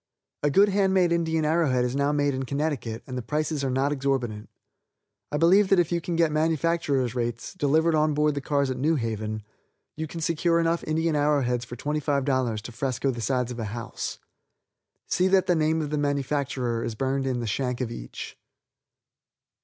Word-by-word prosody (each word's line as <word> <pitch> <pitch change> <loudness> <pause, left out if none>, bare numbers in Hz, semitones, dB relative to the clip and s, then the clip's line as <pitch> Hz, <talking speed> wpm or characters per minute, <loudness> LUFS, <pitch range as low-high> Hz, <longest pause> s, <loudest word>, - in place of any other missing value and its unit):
A 145 - +2
good 200 +7 +5
hand 195 -1 +2
made 180 -2 +3
Indian 160 -2 +1
arrow 160 0 +2
head 125 -1 +2
is 125 +1 -2
now 140 +1 +2
made 145 -1 +1
in 130 - -2
Connecticut, 140 -5 -2
and 130 - -7
the 125 - -2
prices 150 +4 -2
are 135 - 0
not 135 +3 +1
exorbitant. 130 -6 -2 0.8
I 150 - 0
believe 190 +6 +5
that 195 - +5
if 175 -2 +2
you 170 0 0
can 170 +1 -3
get 165 -2 +3
manufacturers' 155 -5 +1
rates, 120 -1 -3
delivered 160 0 +2
on 155 -1 +2
board 150 0 +2
the 140 - -3
cars 140 -1 0
at 130 - -3
New 155 +5 +2
Haven, 110 -4 -3 0.5
you 160 +1 -4
can 165 - -7
secure 170 +1 +1
enough 165 0 +1
Indian 160 0 0
arrow 145 -1 +2
heads 125 -1 -1
for 120 - -8
$25 135 -5 0
to 120 - -8
fresco 135 +2 -1
the 120 -2 -6
sides 125 +1 0
of 120 - -6
a 115 - -2
house. 115 +3 -5 0.9
See 185 +1 +2
that 190 -1 +4
the 180 - +3
name 160 0 +1
of 150 - -5
the 150 - 0
manufacturer 140 -4 -1
is 115 - -3
burned 135 +2 -1
in 125 -2 -1
the 120 - -3
shank 125 +3 -2
of 125 -3 -2
each. - - -7
145 Hz, 200 wpm, -26 LUFS, 125-160 Hz, 0.9 s, good